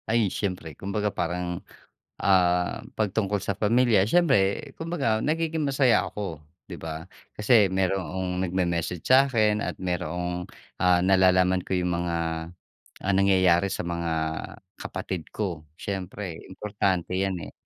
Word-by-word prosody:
Ay, 110 -4 +2
siyempre 90 -6 -3
kumbaga 100 +5 -2
parang, 90 0 -2 0.6
ah, 90 -2 +3 0.2
'pag 110 -2 +1
tungkol 105 -2 0
sa 100 - -1
pamilya, 115 -2 +3
siyempre 140 - +2
kumbaga 145 -10 0
nagiging 160 +2 0
masaya 135 -3 +3
ako, 90 -7 -5 0.2
'di 90 - -8
ba? 80 0 -6 0.3
Kasi 105 -1 +5
mayroong 95 -1 -1
nagme-message 90 -2 -1
sa'kin 115 -6 +4
at - - -3
mayroong, 90 0 -3 0.4
ah, 90 -1 +5
nalalaman 95 -1 +4
ko - - -3
yung 90 0 0
mga, 85 -1 -1 0.9
ah, 100 - +2
nangyayari 95 -1 +4
sa - - -3
mga 85 -1 -2 0.7
kapatid 90 -5 -5
ko 90 -7 -3 0.2
siyempre 95 -2 -5
importante 95 -2 -1
'yan, 95 -1 0
eh. - - -39
95 Hz, 125 wpm, -26 LUFS, 90-105 Hz, 0.9 s, Kasi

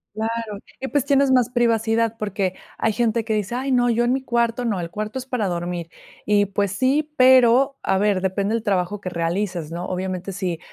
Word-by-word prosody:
Claro, 220 -2 -3 0.2
y 265 - -4
pues 285 -3 +1
tienes 280 -1 +3
más 250 -2 +3
privacidad, 230 -2 +1
porque 195 -3 -1 0.2
hay 220 - +1
gente 230 0 +1
que 225 - -1
dice: 210 +2 -2
"Ay, 265 +2 -2
no, 245 -1 +3
yo 235 +1 +2
en 245 - +2
mi 265 - -1
cuarto 235 -1 0
no, 215 -6 -1
el 170 -1 -5
cuarto 215 +5 -4
es 260 - -5
para 250 -6 -1
dormir". 175 -1 -3 0.4
Y, 205 0 +4
pues, 200 0 -1
sí, 285 +6 +1
pero, 260 +1 +5
a 190 - +1
ver, 200 -1 +1
depende 195 +3 -1
del 230 - 0
trabajo 200 -1 -1
que 185 - -4
realices, 170 -1 -2
¿no?, 175 +2 -4
obviamente, 185 +1 -3
si 180 -3 -3
215 Hz, 205 wpm, -22 LUFS, 190-245 Hz, 0.4 s, pero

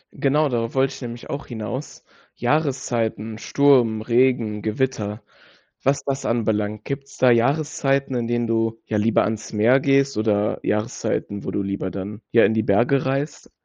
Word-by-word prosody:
Genau, 150 +2 +2
darauf 115 -2 -2
wollte 135 +1 +2
ich - - -11
nämlich 120 -1 -7
auch 140 0 -5
hinaus. 120 +4 -6 0.3
Jahreszeiten, 120 -6 -1
Sturm, 125 -6 +3
Regen, 115 -3 +2
Gewitter, 110 -2 -2 0.6
was 135 +1 +1
das 135 -1 -3
anbelangt. 105 -2 -1
Gibt's 140 0 -6
da 125 -1 +5
Jahreszeiten, 135 +2 +1
in 120 -1 -1
denen 120 0 0
du, 115 0 0
ja, 105 - -1
lieber 110 +2 +3
ans 110 +1 -4
Meer 115 +5 +4
gehst 135 0 +2
oder 105 -1 +1
Jahreszeiten, 105 -1 -2
wo - - -4
du 100 - -1
lieber 100 -1 -3
dann, 100 +3 -6
ja, 115 - +6
in 105 - +2
die 110 - +2
Berge 120 +6 +2
reist? 140 +3 -3
120 Hz, 160 wpm, -22 LUFS, 110-135 Hz, 0.6 s, ja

